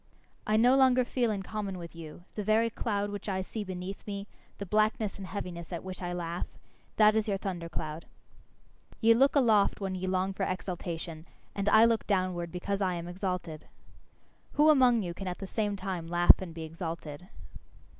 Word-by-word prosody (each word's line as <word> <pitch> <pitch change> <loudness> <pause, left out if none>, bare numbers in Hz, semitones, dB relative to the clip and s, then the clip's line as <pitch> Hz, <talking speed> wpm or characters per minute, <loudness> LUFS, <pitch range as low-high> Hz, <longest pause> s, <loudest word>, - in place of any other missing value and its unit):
I 215 0 +3
no 245 +4 +5
longer 255 -2 +5
feel 245 -1 0
in 200 -3 -2
common 200 -2 -4
with 170 -1 -9
you; 165 +1 -10
the 210 - -3
very 220 +2 +3
cloud 205 -2 -2
which 205 0 -5
I 190 -1 -1
see 215 +3 -5
beneath 185 +1 -6
me, 200 -1 -4 0.3
the 200 - -5
blackness 215 +1 +1
and 190 - -6
heaviness 170 -2 -6
at 170 - -4
which 185 0 -7
I 175 -1 -3
laugh 175 0 -3 0.5
that 215 0 +6
is 220 0 +1
your 200 -2 0
thunder 180 -4 -4
cloud. 155 -1 -5 0.9
Ye 230 0 +6
look 270 +5 +4
aloft 220 -7 +4
when 195 -2 -3
ye 185 0 -3
long 185 +1 0
for - - -7
exaltation; 170 -3 -4 0.3
and 200 0 0
I 220 +2 +7
look 230 -1 +1
downward 185 -4 0
because 195 +3 -3
I 185 -2 +1
am 170 0 -5
exalted. 180 -3 -4 0.9
Who 305 +1 +6
among 250 -6 +5
you 175 -2 -4
can 195 +2 -7
at 180 - -3
the 195 - -6
same 205 +1 -1
time 185 -4 -4
laugh 175 +2 +6
and 185 -3 -6
be 165 0 -7
exalted? 165 0 -6
190 Hz, 190 wpm, -30 LUFS, 175-215 Hz, 0.9 s, I